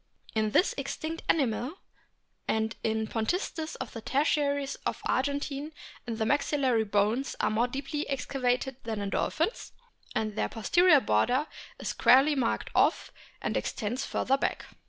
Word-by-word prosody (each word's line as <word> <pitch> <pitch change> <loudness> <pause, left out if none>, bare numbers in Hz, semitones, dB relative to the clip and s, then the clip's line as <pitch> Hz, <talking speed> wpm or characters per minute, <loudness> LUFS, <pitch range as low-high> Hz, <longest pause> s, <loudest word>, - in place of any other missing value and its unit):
In 220 -1 +1
this 360 - +3
extinct 325 +1 -4
animal 260 0 +1 0.7
and 220 0 0
in 220 0 0
Pontistes 315 - -2
of 260 - -6
the 230 - -6
tertiaries 285 +1 +1
of - - -2
the - - +1
Argentine 285 +2 -1 0.3
the 225 -2 -2
maxillary 265 -2 +2
bones 210 +6 +1
are - - +1
more 230 +3 +2
deeply 275 +4 -4
excavated 260 -1 -1
than 225 -2 -3
in 200 -1 -3
dolphins, 330 +9 -1 0.4
and 215 -1 -1
their - - 0
posterior 310 +6 +4
border 245 - +2 0.3
is - - -4
squarely 270 +4 +5
marked 260 -5 -1
off - - +2 0.3
and - - -1
extends 245 +4 -2
further 270 0 +1
back. - - -1
260 Hz, 140 wpm, -29 LUFS, 220-285 Hz, 0.7 s, squarely